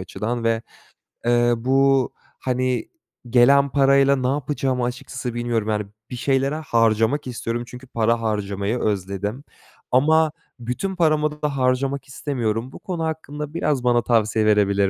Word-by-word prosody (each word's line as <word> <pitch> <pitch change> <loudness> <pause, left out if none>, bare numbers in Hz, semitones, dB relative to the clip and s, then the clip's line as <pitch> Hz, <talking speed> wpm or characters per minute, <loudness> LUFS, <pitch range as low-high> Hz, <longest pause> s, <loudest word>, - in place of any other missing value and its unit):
açıdan 115 +5 -4
ve, 115 0 +1 0.6
eee, 120 0 +3
bu, 135 +1 +3 0.3
hani, 130 -1 -1 0.4
gelen 140 +3 +5
parayla 140 +1 +4
ne 130 -1 -1
yapacağımı 135 -2 -1
açıkçası 120 0 -4
bilmiyorum, 120 -2 -1
yani, 105 -1 0 0.2
bir 125 - -5
şeylere 135 +3 +1
harcamak 115 -1 +1
istiyorum 120 0 -3
çünkü 125 +1 -11
para 115 -1 +1
harcamayı 105 0 -1
özledim. 100 +5 -2 0.5
Ama 155 +4 +4 0.3
bütün 125 +12 -3
paramı 155 -3 +1
da 145 -2 -1
harcamak 135 +1 0
istemiyorum. 125 -3 -2
Bu - - -11
konu 175 -3 -4
hakkında 150 -1 -4
biraz 150 -6 0
bana 120 -1 +3
tavsiye 110 -2 +2
verebilir 100 -2 +3
125 Hz, 135 wpm, -22 LUFS, 115-140 Hz, 0.6 s, gelen